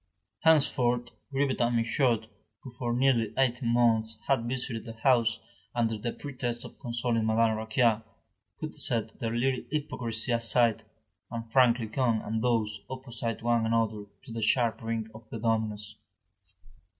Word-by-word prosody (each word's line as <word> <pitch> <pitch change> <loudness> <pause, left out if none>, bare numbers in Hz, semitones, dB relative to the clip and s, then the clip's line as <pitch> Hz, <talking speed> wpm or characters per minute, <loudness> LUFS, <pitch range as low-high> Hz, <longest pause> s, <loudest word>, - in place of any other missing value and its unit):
Henceforth, 125 -6 +3 0.2
Grivet 135 -1 0
and 120 0 +2
Michaud, 115 0 +2 0.4
who 130 - -8
for 120 -1 -3
nearly 120 -3 +2
eighteen 125 -2 +2
months 115 -2 +2
had 125 -4 +2
visited 125 -3 -2
the 115 -1 -8
house 115 -1 +3 0.4
under 115 -2 +1
the 110 +2 -3
pretext 125 -4 -4
of - - -12
consoling 115 -1 -1
Madame 110 0 +3
Raquin, 110 +1 +2 0.6
could - - -5
set 115 -2 -1
their 115 0 -2
little 130 +1 +1
hypocrisy 120 -6 -2
aside, 115 -1 +2 0.4
and 115 -1 -6
frankly 120 -2 +4
come 115 0 +1
and 110 +1 -2
doze 110 -4 0
opposite 120 -3 -5
one 120 -1 +2
another 110 -2 0 0.2
to 130 - -11
the 115 0 -4
sharp 115 +1 +2
ring 115 -1 -2
of 110 0 -13
the - - -5
dominoes. 110 -2 -1
115 Hz, 145 wpm, -29 LUFS, 110-125 Hz, 0.6 s, frankly